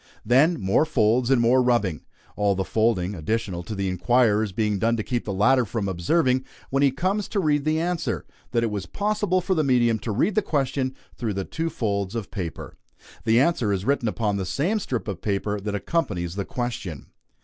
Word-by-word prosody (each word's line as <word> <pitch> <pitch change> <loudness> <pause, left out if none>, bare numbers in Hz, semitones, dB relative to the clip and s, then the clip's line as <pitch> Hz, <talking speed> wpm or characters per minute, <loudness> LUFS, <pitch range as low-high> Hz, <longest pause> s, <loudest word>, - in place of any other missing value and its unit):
Then 150 +7 +4
more 95 +9 +3
folds 120 -5 +2
and 135 -2 +4
more 120 +2 +4
rubbing 115 -10 +1 0.3
all 100 -1 +2
the 95 - -1
folding, 105 -3 +1
additional 100 +1 -2
to 105 +5 -6
the 100 -1 -1
inquirer's, 105 +2 +2
being 105 0 0
done 115 +3 +2
to 110 - -2
keep 120 +1 -2
the 105 - -3
latter 125 +7 +4
from 110 -2 -3
observing, 130 - +1 0.3
when 135 +1 +2
he 140 - +5
comes 190 +9 -1
to 210 - -1
read 150 -5 +1
the 155 +1 +2
answer, 170 -1 -2 0.2
that 115 -1 +1
it 115 - 0
was 100 -4 -4
possible 205 - 0
for 190 +2 0
the 160 -4 +1
medium 120 -4 +3
to 115 - -4
read 165 - +1
the 215 - +3
question 135 -6 -1 0.2
through 115 -4 -2
the 95 -1 -2
two 165 +1 -3
folds 100 -7 -2
of 110 -5 -4
paper. 90 -6 -6 0.5
The 115 +1 +4
answer 130 -8 +2
is 95 0 -1
written 135 -3 +1
upon 105 -2 -1
the 95 - -2
same 175 - 0
strip 125 - -3
of 100 -5 -4
paper 105 0 -1
that 105 +1 -3
accompanies 100 - -1
the 100 0 -3
question. 115 - -4
115 Hz, 205 wpm, -24 LUFS, 100-140 Hz, 0.5 s, he